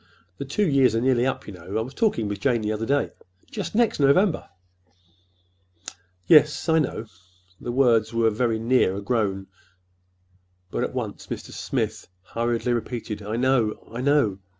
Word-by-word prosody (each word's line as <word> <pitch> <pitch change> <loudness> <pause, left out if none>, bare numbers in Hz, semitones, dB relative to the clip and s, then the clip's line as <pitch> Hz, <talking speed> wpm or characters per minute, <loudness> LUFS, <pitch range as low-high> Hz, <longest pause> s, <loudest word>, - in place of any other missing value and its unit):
"The 140 - -4
two 190 +9 0
years 135 -6 +3
are - - +2
nearly 130 -1 +2
up, 135 - -3
you 105 - -8
know,—I 95 +5 -4
was 125 +4 -6
talking 205 - 0
with 100 -1 -4
Jane 120 +1 +1
the 105 0 -1
other 110 +1 -3
day—just 115 - -4
next 235 -6 +2
November." 155 +7 +3 1.8
"Yes, 150 - +5
I 160 0 +4
know." 130 -6 -2 0.5
The 120 - -5
words 120 -4 +3
were 115 -1 +2
very 115 +1 0
near 115 -4 +2
a 100 - -4
groan, 100 -4 -1 1.3
but - - -1
at - - -4
once - - -5
Mr. - - -6
Smith - - -3 0.2
hurriedly 120 +4 -1
repeated, 115 -2 -4
"I 105 +2 -4
know—I 120 -2 0
know!" 135 -8 +2
120 Hz, 150 wpm, -24 LUFS, 110-135 Hz, 1.8 s, Yes